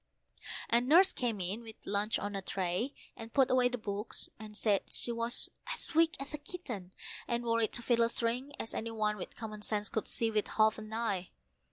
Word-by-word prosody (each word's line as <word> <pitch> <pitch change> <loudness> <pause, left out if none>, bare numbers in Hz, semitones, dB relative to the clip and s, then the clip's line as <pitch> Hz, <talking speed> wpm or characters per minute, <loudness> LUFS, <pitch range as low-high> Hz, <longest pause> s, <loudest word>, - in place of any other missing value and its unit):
And 240 +2 +3
Nurse 355 +7 +7
came 235 -5 -1
in 190 +5 -2
with 225 -2 -10
luncheon 205 +2 0
on 205 0 -3
a 195 - -1
tray, 190 +8 -1 0.2
and 225 0 -8
put 270 0 +4
away 250 -1 +5
the 245 - -2
books, 210 -1 -4
and 215 -1 -8
said 205 -3 +3
she 240 - +1
was 230 0 0 0.2
as 345 - 0
weak 325 +1 +4
as 275 +2 -3
a 300 - -3
kitten, 255 - -6 0.4
and 235 0 0
worried 230 -1 +2
to 240 - -1
fiddlestrings, 235 +2 +2
as 225 - -4
any 230 - -2
one 215 -1 +1
with 180 - -7
common 215 -2 -6
sense 210 0 0
could 220 - -2
see 230 -1 +1
with 210 -1 +1
half 220 0 +3
an 215 0 -8
eye. 210 -5 -1
225 Hz, 200 wpm, -33 LUFS, 210-240 Hz, 0.4 s, Nurse